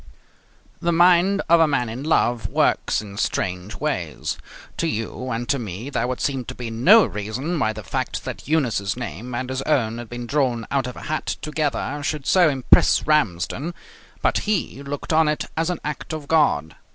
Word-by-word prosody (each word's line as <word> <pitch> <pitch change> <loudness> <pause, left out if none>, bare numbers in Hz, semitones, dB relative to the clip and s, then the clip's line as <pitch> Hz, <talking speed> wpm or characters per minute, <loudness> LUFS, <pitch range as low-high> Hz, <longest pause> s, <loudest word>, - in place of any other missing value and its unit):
The 170 - +1
mind 180 +3 +4
of 170 +1 +6
a 165 - +5
man 140 -5 0
in 115 +4 -5
love 120 -6 +1
works - - +1
in 100 -1 -10
strange 90 0 -2
ways. - - -2 0.4
To 165 - 0
you 115 0 -3
and 120 0 -3
to 140 -1 +2
me 110 +4 -6
there 125 - 0
would 125 0 -3
seem 135 -3 -1
to 125 - -7
be 120 -2 -5
no 185 - +6
reason 125 - -3
why 110 -5 +2
the 110 -1 -8
fact - - -3
that - - -6
Eunice's 120 -10 0
name 120 0 -5
and 130 +1 -3
his 130 0 -2
own 120 -6 0
had 120 -2 -8
been 120 0 -6
drawn 125 -3 0
out 135 -3 +1
of 125 - -7
a - - -9
hat 155 0 -2
together 150 -2 -2
should 145 -1 -3
so 180 -4 +5
impress 135 -3 +4
Ramsden, 150 - 0 0.5
but - - +3
he 185 -9 -1
looked 140 +3 -4
on 160 0 +4
it 150 0 0
as 165 +2 0
an 180 - -2
act 150 +1 -4
of 155 -2 -6
God. 80 - +2
135 Hz, 190 wpm, -23 LUFS, 115-155 Hz, 0.5 s, of